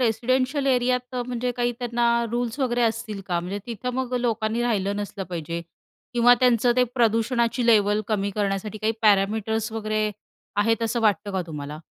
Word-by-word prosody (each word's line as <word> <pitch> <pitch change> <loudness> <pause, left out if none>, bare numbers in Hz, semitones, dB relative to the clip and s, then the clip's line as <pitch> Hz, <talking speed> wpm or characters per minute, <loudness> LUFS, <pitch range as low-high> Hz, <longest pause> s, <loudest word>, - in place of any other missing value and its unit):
Residential 255 +4 +1
एरियात, 250 -1 +1
म्हणजे 245 0 -2
काही 240 0 +1
त्यांना 240 -1 0 0.2
रुल्स 240 +1 -2
वगैरे 245 -2 +1
असतील 225 -3 -1
का? 175 -2 0
म्हणजे 185 +4 -4
तिथं 240 +1 -4
मग 255 -1 -3
लोकांनी 225 0 0
राहिलं 200 -4 0
नसलं 205 -1 -4
पाहिजे 170 0 -4 0.5
किंवा 245 +1 +6
त्यांचं 245 -1 +4
ते 250 - +5
प्रदूषणाची 235 +1 +1
लेवल 210 -2 +4
कमी 200 -2 0
करण्यासाठी 205 +1 -2
काही 220 +1 0
पॅरामीटर्स 220 +2 +2
वगैरे 215 -1 -1 0.5
आहेत 225 +1 +1
असं 230 +1 0
वाटतं 205 -3 +1
का 190 -1 -1
तुम्हाला? 150 -1 -6
225 Hz, 155 wpm, -24 LUFS, 205-245 Hz, 0.5 s, किंवा